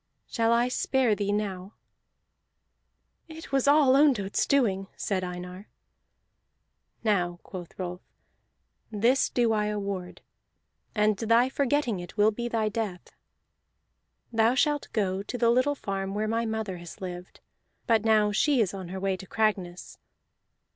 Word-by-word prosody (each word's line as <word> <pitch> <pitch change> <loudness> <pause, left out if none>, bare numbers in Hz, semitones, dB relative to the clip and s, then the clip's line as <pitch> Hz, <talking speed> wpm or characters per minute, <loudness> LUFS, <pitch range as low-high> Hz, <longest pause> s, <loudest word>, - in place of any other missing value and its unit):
Shall 230 -1 0
I 235 +1 +3
spare 255 -2 +1
thee 205 -1 -1
now?" 200 -1 -3 1.5
"It 320 -2 -11
was 275 0 +1
all 285 -2 +5
Ondott's 255 -9 +3
doing," 200 -9 +1
said 190 -2 -1
Einar. 180 +2 -7 1.3
"Now," 180 -5 +1
quoth 175 -3 -9
Rolf, 180 -1 -5 0.9
"this 230 +6 +2
do 235 -2 +2
I 210 -1 +1
award, 200 -3 -4 0.7
and 210 0 +3
thy 230 +4 +3
forgetting 270 -6 0
it 175 +4 -10
will 210 +1 +5
be 235 +3 -4
thy 225 -2 0
death. 210 -4 -4 1.2
Thou 225 +2 +3
shalt 295 +1 +1
go 195 -3 -1
to 230 +5 -6
the 235 -1 +3
little 255 +4 +2
farm 195 -5 -4
where 215 +1 -1
my 230 +1 0
mother 220 -4 -3
has 175 -1 -11
lived, 180 -1 -8 0.5
but 225 -2 +3
now 215 -2 +3
she 275 +6 +2
is 205 -5 +1
on 190 -2 -6
her 190 +2 -6
way 195 0 0
to 190 0 -11
Cragness. 190 -5 -2
215 Hz, 140 wpm, -27 LUFS, 190-235 Hz, 1.5 s, all